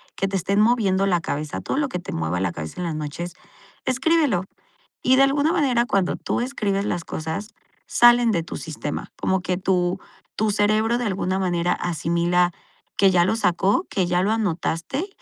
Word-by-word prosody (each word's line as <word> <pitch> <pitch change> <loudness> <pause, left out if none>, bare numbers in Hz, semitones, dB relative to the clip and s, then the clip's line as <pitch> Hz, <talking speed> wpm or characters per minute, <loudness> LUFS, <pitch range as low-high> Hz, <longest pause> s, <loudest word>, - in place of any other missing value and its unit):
que 195 - -1
te 195 - -3
estén 200 +3 +1
moviendo 210 -5 +3
la 175 -3 +2
cabeza. 150 -1 -4
Todo - - -3
lo 290 -1 +1
que 180 - -3
te 180 - -7
mueva 80 +2 -2
la 95 -1 0
cabeza 80 - -7
en - - -2
las 165 - -3
noches, 155 +3 -5 0.5
escríbelo. 265 - +2 0.6
Y 260 - +4
de 275 - +6
alguna 285 +3 +2
manera, 260 -9 +2
cuando 195 -6 0
tú - - -2
escribes 205 -6 -1
las 175 -1 -2
cosas, 160 +7 -4 0.4
salen 240 -1 +5
de 170 -6 +1
tu - - -7
sistema. 155 -2 -5
Como 190 0 0
que 180 0 -1
tu 185 -1 0 0.4
tu 220 0 +1
cerebro 215 +3 +2
de 245 - -2
alguna 190 -1 -1
manera 175 -2 0
asimila 175 +1 +1 0.4
que 195 -1 +5
ya 175 -1 +4
lo 220 +4 +1
sacó, 195 - +1
que 185 -3 0
ya 180 +1 +1
lo 205 - +1
anotaste 205 - -1
190 Hz, 185 wpm, -23 LUFS, 175-225 Hz, 0.6 s, de